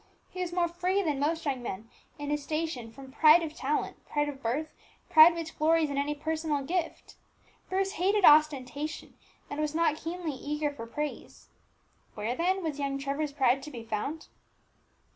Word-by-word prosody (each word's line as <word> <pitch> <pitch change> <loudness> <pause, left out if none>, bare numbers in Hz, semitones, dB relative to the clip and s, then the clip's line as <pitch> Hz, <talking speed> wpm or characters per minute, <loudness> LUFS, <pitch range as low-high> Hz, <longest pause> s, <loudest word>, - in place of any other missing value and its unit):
He 365 - -5
was 355 -1 -2
more 350 -1 +1
free 360 +3 0
than 300 -5 -1
most 320 +3 0
young 270 -3 -1
men 220 -2 -6 0.3
in 290 0 -4
his 295 0 0
station 305 -6 -3
from 265 +3 -12
pride 310 +4 +6
of 310 -2 -5
talent, 290 +1 -2
pride 295 0 0
of 275 -2 -8
birth, 275 +7 -2 0.4
pride 320 +2 +9
which 330 -2 -6
glories 315 -1 +3
in 280 - -3
any 290 +1 -1
personal 310 -1 -2
gift. 340 +3 -3 0.5
Bruce 385 +1 0
hated 395 +2 +2
ostentation, 295 -1 +3 0.3
and 285 - -6
was 305 0 -2
not 330 -2 +2
keenly 330 -1 -4
eager 295 +2 -2
for 230 -5 -8
praise. 295 +5 -6 0.7
Where, 220 +3 -2
then, 370 +4 0
was 300 -3 -3
young 275 -1 -1
Trevor's 280 +2 -2
pride 270 -2 +2
to 300 - -8
be 240 -6 -8
found? 230 +8 -4
300 Hz, 175 wpm, -29 LUFS, 275-330 Hz, 0.7 s, pride